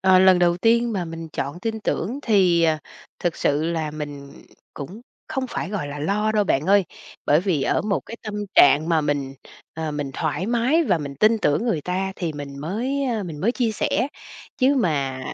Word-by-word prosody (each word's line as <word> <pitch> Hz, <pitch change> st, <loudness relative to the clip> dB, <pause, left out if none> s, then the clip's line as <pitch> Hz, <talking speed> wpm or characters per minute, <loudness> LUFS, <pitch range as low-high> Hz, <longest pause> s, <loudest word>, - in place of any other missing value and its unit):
ờ, 190 Hz, -1 st, +5 dB
lần 185 Hz, -1 st, +6 dB
đầu 175 Hz, -1 st, +3 dB
tiên 230 Hz, +4 st, +2 dB
mà 185 Hz, -3 st, -1 dB
mình 165 Hz, -1 st, -7 dB
chọn 140 Hz, +4 st, -4 dB
tin 220 Hz, +1 st, -3 dB
tưởng 215 Hz, +4 st, -2 dB
thì, 185 Hz, -8 st, +3 dB
à, 160 Hz, -2 st, +3 dB, 0.4 s
thực 175 Hz, -2 st, -1 dB
sự 150 Hz, +2 st, +1 dB
là 160 Hz, -2 st, -1 dB
mình 145 Hz, -2 st, -7 dB, 0.4 s
cũng 175 Hz, +10 st, -8 dB, 0.3 s
không 265 Hz, -1 st, -2 dB
phải, 190 Hz, -, -4 dB
gọi 185 Hz, -9 st, -3 dB
là, 145 Hz, -, -6 dB
lo 205 Hz, +8 st, 0 dB
đâu 210 Hz, -1 st, +2 dB
bạn 150 Hz, -3 st, 0 dB
ơi. 200 Hz, -1 st, +5 dB, 0.4 s
Bởi 150 Hz, +2 st, +4 dB
vì 175 Hz, -7 st, 0 dB
ở -, -, +1 dB
một 205 Hz, -2 st, 0 dB
cái 230 Hz, -, -7 dB
tâm 215 Hz, -2 st, -6 dB, 0.2 s
trạng 150 Hz, +3 st, +6 dB
mà 165 Hz, -2 st, +3 dB
mình, 140 Hz, -2 st, -2 dB, 0.4 s
ờ, 160 Hz, -1 st, -3 dB
mình 145 Hz, -2 st, -3 dB
thoải 155 Hz, +4 st, -2 dB
mái, 245 Hz, +8 st, +2 dB
và 185 Hz, -8 st, +2 dB
mình 140 Hz, -2 st, -6 dB
tin 220 Hz, +1 st, +5 dB
tưởng 150 Hz, +4 st, +1 dB
người 220 Hz, -10 st, 0 dB
ta 185 Hz, +4 st, -2 dB
thì 170 Hz, -3 st, -3 dB
mình 140 Hz, -1 st, -7 dB
mới, 245 Hz, -, -2 dB
ơ, 235 Hz, -5 st, -1 dB
mình 160 Hz, -5 st, -7 dB
mới 230 Hz, +6 st, +2 dB
chia 240 Hz, -4 st, 0 dB
sẻ. 245 Hz, +4 st, 0 dB, 0.5 s
Chứ 270 Hz, +2 st, +4 dB
mà, 140 Hz, -, 0 dB
175 Hz, 205 wpm, -23 LUFS, 150-215 Hz, 0.5 s, lần